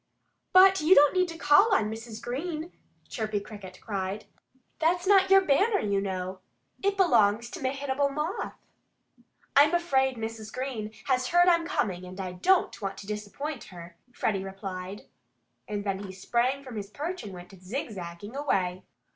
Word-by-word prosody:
"But 380 0 +7
you 330 +5 +6
don't 290 0 +6
need 365 -1 +2
to 330 -1 -8
call 330 +8 +5
on 215 - +1
Mrs. 225 0 -7
Green!" 315 +6 -4 0.4
Chirpy 215 -2 -2
Cricket 200 -3 -11
cried. 200 -1 -4 0.5
"That's 345 +3 +1
not 385 -1 +5
your 390 0 +7
banner, 390 +7 +3
you 200 -1 0
know. 185 -1 -4 0.4
It 400 0 +1
belongs 235 - +3
to 360 - -7
Mehitable 275 +1 0
Moth." 300 +6 -3 1.0
"I'm 295 +4 +6
afraid 265 -7 +1
Mrs. 220 -1 -6
Green 255 -5 -4
has 255 -1 +1
heard 350 +3 +4
I'm 335 -2 +4
coming; 185 - -1
and 185 +1 -10
I 185 -1 -4
don't 350 - +1
want 195 -1 -4
to 195 - -9
disappoint 215 +8 -5
her," 170 -1 -11 0.2
Freddie 200 -5 -1
replied. 195 0 -7 0.6
And 205 -1 -3
then 195 -2 -2
he 200 -2 -7
sprang 240 +8 -1
from 255 -4 -8
his 200 -1 -5
perch 330 - -5
and 205 - -8
went 180 +1 -11
zigzagging 195 -1 -6
away. 185 -11 0
235 Hz, 160 wpm, -28 LUFS, 195-310 Hz, 1.0 s, But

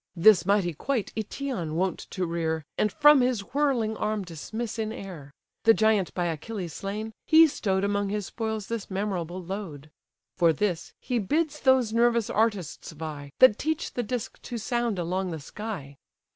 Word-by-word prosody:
This 180 0 +6
mighty 200 -4 +2
quoit 235 - -2
Aëtion 220 - -3
wont 185 +2 0
to 185 -2 -2
rear, 160 -2 -2
And 210 - +1
from 295 -3 +6
his 250 -4 +1
whirling 265 -7 +1
arm 215 -1 -1
dismiss 215 +8 -5
in 220 -1 -1
air; 175 -10 -8 0.3
The 225 -1 +6
giant 215 -4 +2
by 175 - 0
Achilles 170 +2 -4
slain, 210 +5 -5
he 320 +1 +8
stow'd 195 -10 0
Among 200 0 0
his 205 -1 -2
spoils 220 -1 -3
this 230 -2 -4
memorable 185 -3 -3
load. 165 -6 -6 0.5
For 170 -2 +5
this, 175 0 -1
he 245 -2 -1
bids 300 - 0
those 260 -5 +3
nervous 235 -1 +3
artists 205 -9 -1
vie, 150 -2 -7
That 255 -5 +7
teach 315 +2 -2
the 245 - -1
disk 240 0 -4
to 240 - -5
sound 235 -1 -1
along 180 +2 -1
the 160 -2 -4
sky. 145 -5 -7
205 Hz, 165 wpm, -27 LUFS, 175-230 Hz, 0.5 s, he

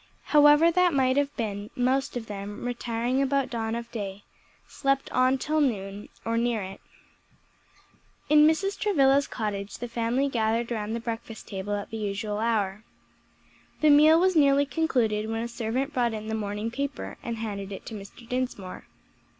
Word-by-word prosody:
However 295 +3 +7
that 360 -2 +3
may 260 -1 +3
have 285 +1 0
been, 205 -2 -3
most 260 +1 0
of 230 - -5
them, 205 +1 -7
retiring 245 +1 -1
about 275 0 0
dawn 225 -1 -2
of 235 0 -6
day, 200 -3 -5 0.4
slept 275 -1 -1
on 255 +1 +3
till 310 +3 0
noon, 205 -6 -2 0.2
or 230 0 +1
near 235 -3 0
it. 190 +1 -8 1.5
In 300 0 +6
Mrs. 390 +6 0
Travilla's 280 -8 +3
cottage 205 -3 -4
the 245 - -5
family 235 +3 0
gathered 230 -1 0
round 220 -1 -2
the - - -2
breakfast 225 -1 -6
table 200 +1 -3
at 205 +3 -6
the 225 - -4
usual 210 0 -3
hour. 215 -3 0 1.0
The 305 -1 +6
meal 310 +3 +7
was 370 0 +3
nearly 285 -2 +5
concluded 240 -9 0
when 225 0 -2
a - - -3
servant 235 +5 -2
brought 240 -3 +1
in 215 0 -6
the - - -2
morning 210 +1 -3
paper 280 +2 -4
and 235 -1 -4
handed 205 -3 -5
it 195 - -8
to - - -7
Mr. 210 +3 -10
Dinsmore. 250 -7 -4
235 Hz, 165 wpm, -27 LUFS, 215-275 Hz, 1.5 s, However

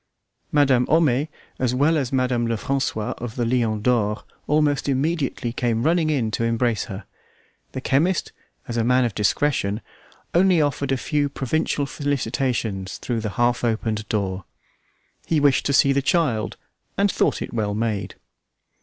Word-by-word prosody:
Madame 135 -4 +3
Homais, 150 -3 +3 0.3
as 125 -1 +1
well 145 +5 +3
as 135 -5 -1
Madame 125 -3 +1
Lefrancois 115 -1 -1
of 115 -2 -6
the 120 - 0
Lion 115 -3 0
d'Or, 110 -4 +1 0.2
almost 150 -1 +2
immediately 135 -3 -1
came 120 -2 0
running 165 0 +2
in 125 -8 0
to 115 - -1
embrace 115 -1 0
her. 95 +1 -8 0.7
The 130 - -4
chemist, 165 +8 +1 0.4
as 120 -1 -2
man 125 +2 +3
of 115 - -2
discretion, 105 -1 +1 0.5
only 180 0 +4
offered 145 -2 0
a 135 - +2
few 145 +2 0
provincial 140 +1 -1
felicitations 125 -8 -2
through 120 -2 -3
the 110 -1 -3
half 120 0 +2
opened 110 -2 -1
door. 95 -3 -2 0.8
He 160 - +2
wished 140 -2 +3
to - - +1
see 140 0 +5
the 140 - +2
child 135 -8 0 0.4
and 200 0 +3
thought - - +1
it - - -8
well 105 -3 -1
made. 110 -2 -2
125 Hz, 150 wpm, -23 LUFS, 115-145 Hz, 0.8 s, see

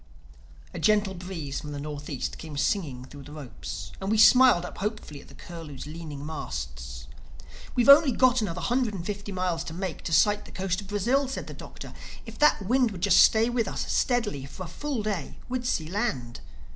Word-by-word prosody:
A - - -5
gentle 210 -2 +3
breeze 175 -6 -5
from 150 -1 -7
the 145 - -5
Northeast 145 -2 -5
came 155 -3 -7
singing 140 -7 -1
through 145 +2 -11
the 145 +2 -11
ropes; 110 -9 -7
and 190 - -2
we 220 - +2
smiled 245 -4 +7
up - - -9
hopefully 205 -8 -4
at - - -17
the 140 - -15
Curlew's 160 -6 -9
leaning 150 -2 -7
masts. 65 - -6 0.7
"We've 245 0 +2
only 280 0 +9
got 255 0 +4
another 180 -4 -3
hundred 245 -4 0
and 170 -3 -6
fifty 205 0 -5
miles 180 -3 -1
to 160 - -6
make, 185 -1 -4
to - - -3
sight 205 +6 +3
the - - -13
coast 185 0 -2
of 200 - -12
Brazil," 240 +8 +1
said 265 - -5
the - - -8
Doctor. - - -10 0.3
"If - - -10
that 295 -8 +4
wind 250 +3 +3
would 190 -5 -8
just - - +6
stay 220 +1 +5
with 240 -3 0
us, - - -3
steady, 220 - 0
for 185 +7 -8
a - - -7
full 260 - -3
day 205 -5 -3
we'd 250 -1 -2
see 160 -9 0
land." 150 - -2
185 Hz, 200 wpm, -27 LUFS, 150-220 Hz, 0.7 s, only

